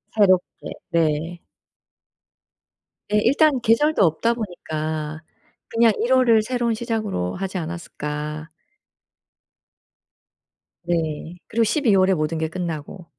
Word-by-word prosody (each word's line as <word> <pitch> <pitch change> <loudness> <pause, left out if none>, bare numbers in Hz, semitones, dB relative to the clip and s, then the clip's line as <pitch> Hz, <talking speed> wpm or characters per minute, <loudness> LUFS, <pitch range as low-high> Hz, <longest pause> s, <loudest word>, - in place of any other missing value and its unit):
새롭게. 185 -4 +2 0.2
네. 165 0 0 1.7
예. 210 - +3
일단 275 +4 +3
계절도 230 +2 +3
없다 175 +8 +2
보니까 155 -7 -4 0.5
그냥 230 -1 +4
1 250 +2 +2
월을 235 -4 +5
새로운 240 -1 -1
시작으로 215 - -2
하지 190 0 -4
않았을까. 155 -2 -5 2.4
네. 165 0 -2
그리고 230 +1 +1
12 225 -3 +2
월에 190 0 +4
모든 155 0 -1
게 160 0 -1
끝나고. 170 0 -5
185 Hz, 200 characters per minute, -22 LUFS, 160-230 Hz, 2.4 s, 월을